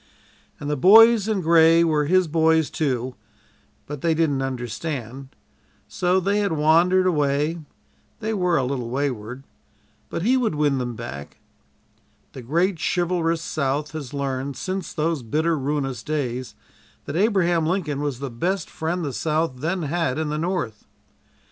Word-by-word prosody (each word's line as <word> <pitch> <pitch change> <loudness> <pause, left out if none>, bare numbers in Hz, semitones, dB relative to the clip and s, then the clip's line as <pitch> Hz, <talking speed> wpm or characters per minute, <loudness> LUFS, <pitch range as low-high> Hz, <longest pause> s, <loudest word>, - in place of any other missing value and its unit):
And 145 - -6
"the 150 - 0
Boys 220 - +7
in 215 -3 0
Gray" 165 0 +5
were 155 -3 +1
his 185 +3 +3
"boys," 160 0 +2
too, 130 -5 -1 0.7
but 145 -2 -7
they 165 -1 +1
didn't 150 -4 +1
understand, 130 0 -5 0.6
so 180 +1 +1
they 200 +3 0
had 200 -5 0
wandered 170 +5 +3
away 150 -1 +1 0.6
they 220 0 -2
were 180 -4 +1
a 135 - +1
little 125 -2 -3
wayward, 125 -2 -3 0.7
but 165 - -4
he 250 +5 +3
would 230 -10 0
win 145 -3 +1
them 120 -2 -4
back. 105 -11 -8 1.0
The 130 - -8
great 170 +8 0
chivalrous 170 -2 0
South 145 -1 -2
has 145 -4 -7
learned, 140 -1 -3
since 185 -1 -4
those 160 -2 -1
bitter, 155 +8 0
ruinous 135 -4 -2
days, 130 -5 -3 0.5
that 140 - -5
Abraham 175 -5 +2
Lincoln 160 -6 -1
was 145 -4 -2
the 135 0 -6
best 180 +11 -2
friend 170 +2 -3
the 140 - -4
South 155 -2 -1
then 170 +6 -2
had 150 -3 -1
in 155 -1 -2
the 150 0 -2
North. 165 - -3
155 Hz, 150 wpm, -23 LUFS, 135-175 Hz, 1.0 s, Boys